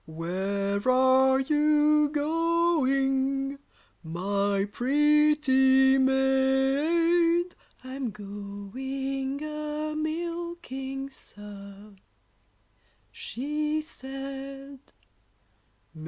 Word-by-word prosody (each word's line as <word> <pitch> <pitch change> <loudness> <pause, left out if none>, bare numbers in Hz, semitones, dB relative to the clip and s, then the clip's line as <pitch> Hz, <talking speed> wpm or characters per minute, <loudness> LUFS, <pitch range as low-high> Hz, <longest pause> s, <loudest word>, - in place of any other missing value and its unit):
] - - -42
Where 190 +5 -2
are 260 +1 +4
you 300 +1 +3
going, 280 -4 0 0.4
my 195 +4 -1
pretty 270 0 +4
maid? 275 +7 +2 0.3
I'm 260 -1 -4
going 260 +8 -5
a 305 0 -4
milking, 310 -4 -4
sir, 205 -2 -12 1.2
she 300 +4 -3
said. 275 -1 -8
270 Hz, 55 wpm, -27 LUFS, 255-300 Hz, 1.2 s, are